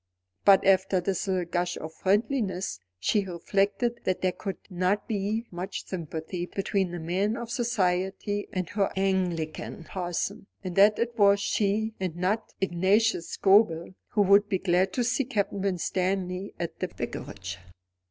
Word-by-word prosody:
But 195 Hz, -2 st, +7 dB
after 190 Hz, 0 st, +4 dB
this 190 Hz, +2 st, -2 dB
little 185 Hz, -2 st, 0 dB
gush 175 Hz, +1 st, -1 dB
of 160 Hz, +1 st, -7 dB
friendliness, 195 Hz, -, 0 dB, 0.2 s
she 200 Hz, -, +2 dB
reflected 200 Hz, +6 st, 0 dB
that 185 Hz, -1 st, 0 dB
there 185 Hz, -, +2 dB
could 195 Hz, +2 st, -5 dB
not 185 Hz, +2 st, 0 dB
be 215 Hz, +2 st, -1 dB
much 185 Hz, +2 st, -5 dB
sympathy 175 Hz, 0 st, -4 dB
between 195 Hz, -1 st, -1 dB
the 175 Hz, 0 st, -5 dB
man 190 Hz, +7 st, 0 dB
of 235 Hz, -1 st, -6 dB
society 205 Hz, -3 st, 0 dB
and 185 Hz, -2 st, -2 dB
her 205 Hz, -1 st, 0 dB
Anglican 180 Hz, -5 st, -1 dB
parson; 185 Hz, +4 st, -3 dB, 0.2 s
and 185 Hz, -2 st, -4 dB
that 205 Hz, +2 st, +6 dB
it 235 Hz, 0 st, -1 dB
was 200 Hz, 0 st, +6 dB
she, 210 Hz, +2 st, 0 dB
and 185 Hz, -4 st, -2 dB
not 195 Hz, +5 st, -1 dB
Ignatius 190 Hz, +1 st, +2 dB
Scobel, 195 Hz, -4 st, +4 dB, 0.2 s
who 205 Hz, -, +2 dB
would 200 Hz, +1 st, +5 dB
be 190 Hz, -, +2 dB
glad 180 Hz, 0 st, +2 dB
to 245 Hz, -, +1 dB
see 245 Hz, +3 st, +1 dB
Captain 205 Hz, -6 st, -1 dB
Winstanley 185 Hz, 0 st, -1 dB
at 170 Hz, -, -4 dB
the -, -, -1 dB
Vicarage. 95 Hz, -3 st, -6 dB
190 Hz, 150 wpm, -27 LUFS, 180-205 Hz, 0.2 s, But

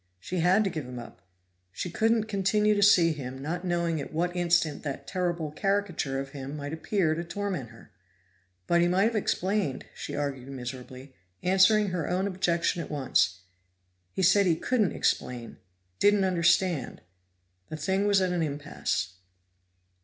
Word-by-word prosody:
She 180 Hz, -, -4 dB
had 185 Hz, +5 st, +4 dB
to 195 Hz, -, -1 dB
give 155 Hz, -5 st, -4 dB
him 125 Hz, 0 st, -7 dB
up; 120 Hz, -, -10 dB, 0.5 s
she 170 Hz, -, -5 dB
couldn't 225 Hz, +4 st, +2 dB
continue 210 Hz, 0 st, +2 dB
to 205 Hz, -, 0 dB
see 180 Hz, -5 st, +6 dB
him 130 Hz, -3 st, -6 dB
not 165 Hz, +6 st, -4 dB
knowing 170 Hz, -3 st, 0 dB
at -, -, -7 dB
what 175 Hz, +3 st, -1 dB
instant 170 Hz, -4 st, +1 dB
that 140 Hz, -2 st, -5 dB
terrible 175 Hz, -4 st, -2 dB
caricature 185 Hz, -7 st, -1 dB
of 135 Hz, 0 st, -5 dB
him 135 Hz, +1 st, -7 dB
might 145 Hz, +1 st, -5 dB
appear 160 Hz, 0 st, 0 dB
to 165 Hz, +2 st, -3 dB
torment 180 Hz, -, -4 dB
her. 115 Hz, 0 st, -16 dB, 0.7 s
But 170 Hz, -, +3 dB
he 175 Hz, -, +4 dB
might 185 Hz, +2 st, +3 dB
have 225 Hz, +2 st, +1 dB
explained, 190 Hz, -7 st, -1 dB
she -, -, -6 dB
argued 140 Hz, -3 st, -3 dB
miserably, 130 Hz, +1 st, -8 dB, 0.3 s
answering 195 Hz, +3 st, +4 dB
her 180 Hz, -4 st, -2 dB
own 185 Hz, +2 st, 0 dB
objection 175 Hz, -3 st, 0 dB
at -, -, -7 dB
once 130 Hz, -10 st, +1 dB, 0.7 s
he's 185 Hz, -, +2 dB
said 200 Hz, 0 st, +4 dB
he 165 Hz, -, +3 dB
couldn't 215 Hz, -, +1 dB
explain, 120 Hz, -2 st, -2 dB, 0.4 s
didn't 205 Hz, -1 st, +4 dB
understand. 175 Hz, -2 st, +1 dB, 0.7 s
The 155 Hz, -, -5 dB
thing 190 Hz, +6 st, 0 dB
was 200 Hz, -1 st, +4 dB
at 185 Hz, -1 st, +1 dB
an 175 Hz, -, 0 dB
impasse. 140 Hz, -, -3 dB
170 Hz, 160 wpm, -28 LUFS, 145-190 Hz, 0.7 s, see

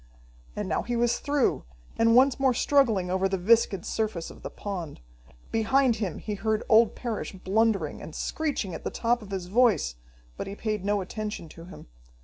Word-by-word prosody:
And 210 Hz, -2 st, -3 dB
now -, -, 0 dB
he 240 Hz, -, -3 dB
was 240 Hz, 0 st, +1 dB
through, 285 Hz, -3 st, +1 dB, 0.3 s
and 230 Hz, 0 st, +4 dB
once 265 Hz, +1 st, +5 dB
more 265 Hz, -2 st, +3 dB
struggling 225 Hz, -11 st, +2 dB
over 190 Hz, +1 st, +1 dB
the 195 Hz, -, 0 dB
viscid 195 Hz, -1 st, +3 dB
surface 210 Hz, -7 st, -2 dB
of -, -, -14 dB
the -, -, -6 dB
pond. 180 Hz, -7 st, -6 dB, 0.5 s
Behind 235 Hz, +2 st, +2 dB
him 195 Hz, -7 st, -3 dB
he 210 Hz, -, -5 dB
heard 215 Hz, +1 st, -1 dB
old 225 Hz, 0 st, +5 dB
Parrish 235 Hz, -4 st, -4 dB
blundering, 195 Hz, -3 st, 0 dB
and 155 Hz, -, -9 dB
screeching 285 Hz, -, -2 dB
at -, -, -7 dB
the -, -, -2 dB
top 240 Hz, +1 st, 0 dB
of 205 Hz, -, -11 dB
his 190 Hz, -2 st, -4 dB
voice, 195 Hz, -, +2 dB, 0.4 s
but -, -, -5 dB
he 195 Hz, -, -6 dB
paid 215 Hz, -2 st, -3 dB
no 205 Hz, 0 st, +1 dB
attention 210 Hz, -2 st, -5 dB
to 165 Hz, +2 st, -12 dB
him. 180 Hz, -, -12 dB
215 Hz, 185 wpm, -27 LUFS, 190-235 Hz, 0.5 s, once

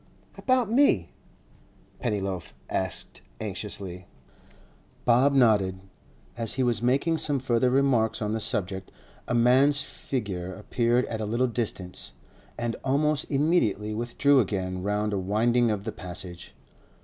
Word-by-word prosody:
'About 255 Hz, -4 st, +1 dB
me?' 235 Hz, -, +3 dB, 0.9 s
Pennyloaf 95 Hz, -6 st, -3 dB, 0.2 s
asked -, -, -3 dB, 0.2 s
anxiously. 100 Hz, -3 st, -5 dB, 1.0 s
Bob 125 Hz, +4 st, +5 dB
nodded. 105 Hz, -7 st, +3 dB, 0.6 s
As 115 Hz, -2 st, -2 dB
he 130 Hz, -, +1 dB
was 120 Hz, -4 st, +1 dB
making 140 Hz, +7 st, +2 dB
some 145 Hz, -2 st, 0 dB
further 125 Hz, -1 st, +2 dB
remarks 125 Hz, -4 st, +2 dB
on 105 Hz, 0 st, -2 dB
the 110 Hz, -, -1 dB
subject, 95 Hz, -4 st, -2 dB, 0.4 s
a 120 Hz, -, 0 dB
man's 130 Hz, +4 st, +4 dB
figure 95 Hz, -10 st, -4 dB
appeared 120 Hz, +4 st, +1 dB
at 110 Hz, -1 st, -4 dB
a -, -, -1 dB
little 120 Hz, +4 st, +1 dB
distance, 110 Hz, -7 st, -4 dB, 0.4 s
and 120 Hz, -1 st, -2 dB
almost 145 Hz, +2 st, +1 dB
immediately 135 Hz, -, +1 dB
withdrew 120 Hz, +5 st, +2 dB
again 95 Hz, -4 st, -1 dB
round 105 Hz, +2 st, -1 dB
a 100 Hz, -, 0 dB
winding 115 Hz, +5 st, +2 dB
of 105 Hz, -2 st, -1 dB
the 110 Hz, -, -3 dB
Passage. 90 Hz, -1 st, -8 dB
115 Hz, 125 wpm, -27 LUFS, 100-130 Hz, 1.0 s, Bob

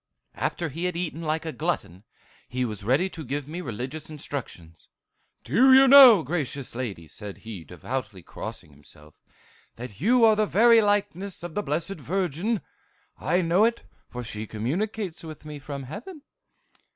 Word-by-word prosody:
"After 170 Hz, -2 st, -2 dB
he 165 Hz, +6 st, -4 dB
had 180 Hz, -2 st, -2 dB
eaten 170 Hz, -2 st, -3 dB
like 160 Hz, 0 st, -2 dB
a 160 Hz, -, -3 dB
glutton, 150 Hz, -, -3 dB, 0.5 s
he 125 Hz, 0 st, -1 dB
was 105 Hz, -3 st, -5 dB
ready 135 Hz, -, +2 dB
to 160 Hz, -, -7 dB
give 140 Hz, +1 st, -4 dB
me 170 Hz, +4 st, -5 dB
religious 130 Hz, +4 st, -6 dB
instruction. 135 Hz, -, -6 dB, 0.7 s
'Do 255 Hz, -, +5 dB
you 270 Hz, 0 st, +7 dB
know, 255 Hz, -, +10 dB
gracious 140 Hz, -3 st, -3 dB
lady,' 110 Hz, -10 st, -5 dB
said 100 Hz, +5 st, -9 dB
he, 105 Hz, -7 st, -7 dB
devoutly 105 Hz, +2 st, -6 dB
crossing 75 Hz, -, -8 dB
himself, 75 Hz, +1 st, -15 dB, 0.6 s
'that 120 Hz, -1 st, -9 dB
you 235 Hz, +4 st, +5 dB
are 220 Hz, -1 st, +6 dB
the 215 Hz, 0 st, +1 dB
very 230 Hz, +3 st, +6 dB
likeness 200 Hz, -3 st, -1 dB
of 175 Hz, -2 st, -6 dB
the 205 Hz, -, -1 dB
Blessed 165 Hz, +3 st, -2 dB
Virgin? 185 Hz, -, -1 dB, 0.6 s
I 175 Hz, +7 st, +1 dB
know 175 Hz, +4 st, +3 dB
it, 235 Hz, +1 st, +1 dB, 0.3 s
for 125 Hz, 0 st, -6 dB
she 110 Hz, -1 st, -6 dB
communicates 175 Hz, -, -3 dB
with 155 Hz, -1 st, -10 dB
me 150 Hz, -1 st, -7 dB
from 140 Hz, 0 st, -7 dB
heaven. 245 Hz, -, -9 dB
155 Hz, 160 wpm, -26 LUFS, 125-195 Hz, 0.7 s, know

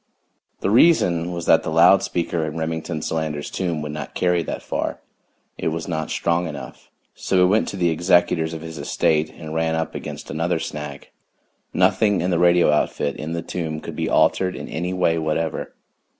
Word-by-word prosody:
The 95 Hz, -, 0 dB
reason 90 Hz, -, +4 dB
was 85 Hz, -1 st, -4 dB
that -, -, +5 dB
the -, -, -4 dB
loud 85 Hz, +4 st, +6 dB
speaker 85 Hz, -3 st, -1 dB
in 80 Hz, 0 st, -4 dB
Remington 80 Hz, -1 st, -3 dB
Solander's 80 Hz, -2 st, -3 dB
tomb 85 Hz, -5 st, -2 dB
would 75 Hz, -, -4 dB
not 75 Hz, -, -7 dB
carry 90 Hz, -1 st, +2 dB
that -, -, -5 dB
far; -, -, -3 dB, 0.6 s
it -, -, -2 dB
was 80 Hz, 0 st, -2 dB
not 80 Hz, -3 st, -3 dB
strong 85 Hz, +1 st, 0 dB
enough. 75 Hz, -3 st, -9 dB, 0.2 s
So 95 Hz, -, -1 dB
we 90 Hz, -, +6 dB
went 105 Hz, +4 st, +2 dB
to 100 Hz, -, -5 dB
the 85 Hz, -2 st, +2 dB
executors 85 Hz, -1 st, +2 dB
of 80 Hz, -, -7 dB
his 80 Hz, -2 st, -7 dB
estate 75 Hz, +2 st, +1 dB
and 80 Hz, -2 st, -9 dB
ran 80 Hz, 0 st, 0 dB
up 80 Hz, 0 st, -2 dB
against -, -, -7 dB
another 85 Hz, +2 st, 0 dB
snag 75 Hz, -3 st, -6 dB, 0.6 s
nothing 105 Hz, -4 st, +3 dB
in 90 Hz, +2 st, 0 dB
the 85 Hz, -, +1 dB
radio 85 Hz, -2 st, +5 dB
outfit 75 Hz, -1 st, 0 dB
in 80 Hz, +2 st, -5 dB
the 85 Hz, -1 st, -3 dB
tomb 80 Hz, -3 st, -4 dB
could -, -, -8 dB
be -, -, -2 dB
altered 95 Hz, -1 st, +2 dB
in -, -, -7 dB
any 90 Hz, +4 st, -3 dB
way 90 Hz, -3 st, +1 dB
whatever. 80 Hz, 0 st, -2 dB
80 Hz, 190 wpm, -22 LUFS, 80-90 Hz, 0.6 s, loud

